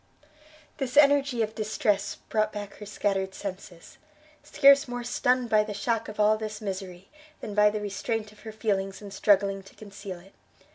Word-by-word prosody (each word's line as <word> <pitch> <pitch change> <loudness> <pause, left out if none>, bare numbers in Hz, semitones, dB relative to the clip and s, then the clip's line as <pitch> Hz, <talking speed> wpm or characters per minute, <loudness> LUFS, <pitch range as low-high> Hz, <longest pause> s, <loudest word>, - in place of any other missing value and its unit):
This 270 0 -3
energy 280 -4 +5
of 215 0 -4
distress 210 -2 -1
brought 215 0 +1
back 205 -1 -7
her 210 - -9
scattered 195 -2 -1
senses, 190 -3 -8 0.4
scarce 280 +1 +5
more 245 0 -4
stunned 245 0 0
by 215 -1 +5
the 210 -1 -6
shock 225 +2 -1
of 215 - -10
all 210 +1 +4
this 215 -1 -5
misery, 190 -3 -6 0.3
than 210 - -6
by 210 0 +5
the 210 0 -3
restraint 210 +2 -3
of 215 - -20
her 220 - -8
feelings 195 -3 -2
in 200 - -9
struggling 195 -1 +2
to 195 - -17
conceal 200 -3 -9
it. 195 +3 -19
210 Hz, 175 wpm, -27 LUFS, 195-225 Hz, 0.4 s, energy